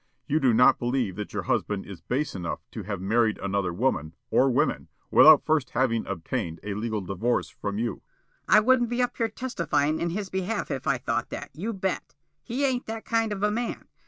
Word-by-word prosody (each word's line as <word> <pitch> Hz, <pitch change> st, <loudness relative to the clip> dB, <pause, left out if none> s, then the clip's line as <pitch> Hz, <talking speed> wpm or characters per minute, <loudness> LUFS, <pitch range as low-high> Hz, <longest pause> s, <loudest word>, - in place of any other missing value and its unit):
You 155 Hz, -, +1 dB
do 130 Hz, -5 st, +4 dB
not 125 Hz, +4 st, +5 dB
believe 120 Hz, -6 st, -1 dB
that 105 Hz, -, -5 dB
your -, -, -3 dB
husband 100 Hz, -2 st, -1 dB
is 100 Hz, -4 st, -10 dB
base 145 Hz, +4 st, -2 dB
enough 90 Hz, -3 st, -4 dB
to -, -, -6 dB
have 100 Hz, -1 st, -4 dB
married 110 Hz, +3 st, +2 dB
another 100 Hz, -2 st, -1 dB
woman, 85 Hz, -, -1 dB, 0.2 s
or 135 Hz, -, +4 dB
women, 140 Hz, +5 st, +1 dB, 0.2 s
without 155 Hz, -2 st, +8 dB
first 155 Hz, -4 st, +1 dB
having 115 Hz, -3 st, 0 dB
obtained 85 Hz, -2 st, -3 dB
a 105 Hz, -, -3 dB
legal 110 Hz, 0 st, -2 dB
divorce 95 Hz, +6 st, -1 dB
from 100 Hz, 0 st, -5 dB
you?" 115 Hz, +2 st, -1 dB
Mrs. -, -, -24 dB
Smilk: -, -, -41 dB
"I -, -, +9 dB
wouldn't 245 Hz, +1 st, +3 dB
be 245 Hz, +1 st, +1 dB
up 245 Hz, -, -2 dB
here 230 Hz, -2 st, 0 dB
testifying 170 Hz, -, -1 dB
in 170 Hz, -, 0 dB
his 195 Hz, +2 st, -4 dB
behalf 190 Hz, +3 st, -2 dB
if 135 Hz, -, -4 dB
I -, -, +3 dB
thought -, -, -2 dB
that, -, -, -7 dB
you 200 Hz, +9 st, -3 dB
bet. 190 Hz, -3 st, -3 dB, 0.3 s
He 255 Hz, +4 st, -1 dB
ain't 255 Hz, -2 st, -1 dB
that 225 Hz, 0 st, -5 dB
kind 225 Hz, -1 st, +1 dB
of 200 Hz, -1 st, -3 dB
a 210 Hz, -, +3 dB
man. 235 Hz, +2 st, -3 dB
135 Hz, 215 wpm, -26 LUFS, -, 0.3 s, I